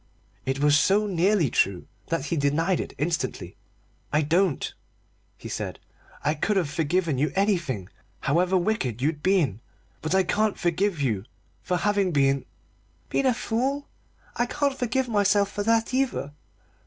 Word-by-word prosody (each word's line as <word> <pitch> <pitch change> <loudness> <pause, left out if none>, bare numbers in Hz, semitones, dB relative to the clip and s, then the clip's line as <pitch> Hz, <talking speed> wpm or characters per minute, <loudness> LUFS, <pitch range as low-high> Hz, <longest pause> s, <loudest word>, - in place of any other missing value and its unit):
It 135 0 0
was 145 0 +5
so 200 +7 +3
nearly 185 - +2
true 95 -2 +1 0.2
that 165 - -1
he 170 - -1
denied 160 +5 +1
it - - -5
instantly. 160 +2 -2 0.6
"I 155 +1 +2
don't," 170 +1 +1 0.6
he - - -9
said. - - -4 0.5
"I 150 - +2
could 200 +6 0
have 165 -7 0
forgiven 160 -1 0
you 150 - +1
anything, 170 - 0 0.3
however 180 +6 +2
wicked 175 - -1
you'd 150 +3 -1
been 165 - +2 0.4
but 155 +4 0
I 190 - +4
can't 210 +3 +1
forgive 175 +1 0
you 110 -8 0 0.4
for 180 - -1
having 200 -1 +1
been 140 -2 +2 0.3
" - - -37
"Been 270 - +2
a 255 - +4
fool? 265 +5 -1 0.5
I 240 - +1
can't 285 +1 0
forgive 255 0 -1
myself 205 -2 +2
for 205 - -3
that, 230 +2 +2
either. 260 - 0
180 Hz, 155 wpm, -26 LUFS, 145-210 Hz, 0.6 s, was